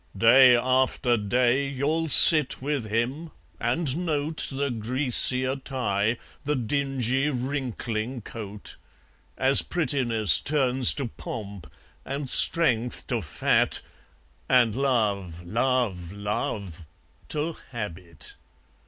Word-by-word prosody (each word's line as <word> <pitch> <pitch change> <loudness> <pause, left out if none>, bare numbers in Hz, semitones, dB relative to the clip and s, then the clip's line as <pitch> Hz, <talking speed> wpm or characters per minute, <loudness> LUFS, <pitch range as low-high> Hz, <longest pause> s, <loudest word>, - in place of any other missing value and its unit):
Day 125 +4 +6
after 130 0 0
day 120 +5 0
you'll 145 +4 -2
sit 155 +1 +8
with 140 -3 -3
him 125 +9 -3 0.3
and 130 +5 -1
note 155 -1 -2
The 140 0 -3
greasier 130 +2 +2
tie, 115 -5 -2 0.3
the 150 +1 -2
dingy 135 +1 -2
wrinkling 125 -3 -4
coat; 105 -1 -10 0.6
As 135 +1 +4
prettiness 125 - +1
turns 130 -4 +2
to 140 -4 -4
pomp, 100 - -9 0.3
and 140 +1 -6
strength 125 -8 +3
to 120 -4 -2
fat, 75 -6 0 0.7
And 120 -4 +3
love, 100 -10 -2
love, 110 -5 -2
love 100 -4 -5 0.4
to 155 +2 -4
habit! 90 - -9
125 Hz, 100 wpm, -24 LUFS, 110-140 Hz, 0.7 s, sit